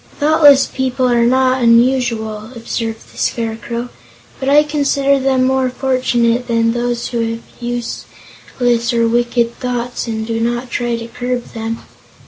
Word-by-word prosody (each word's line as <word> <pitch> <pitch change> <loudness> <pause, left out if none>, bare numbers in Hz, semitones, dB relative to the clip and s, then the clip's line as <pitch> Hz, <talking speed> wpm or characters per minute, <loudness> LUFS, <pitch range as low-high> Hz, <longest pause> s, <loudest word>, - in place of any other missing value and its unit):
"Thoughtless 295 -2 +6
people 260 -1 -1
are 235 -1 +3
not 260 +1 +2
unusual," 230 -3 +2
observed 225 -1 -5
the - - -11
Scarecrow, 235 +1 -3 0.5
"but 265 - -1
I 295 +1 +6
consider 280 -2 +1
them 265 -1 +2
more 260 0 +1
fortunate 250 -2 0
than 230 -1 +2
those 240 0 -2
who 240 - -2 0.2
have 230 - -12 0.2
useless 240 0 -3
or 230 0 +3
wicked 235 0 0
thoughts 245 -1 -3
and 220 -1 -3
do 225 0 -2
not 240 +2 -2
try 240 -1 -1
to 230 0 -6
curb 245 +1 -4
them. 225 0 -5
240 Hz, 140 wpm, -16 LUFS, 230-255 Hz, 0.5 s, Thoughtless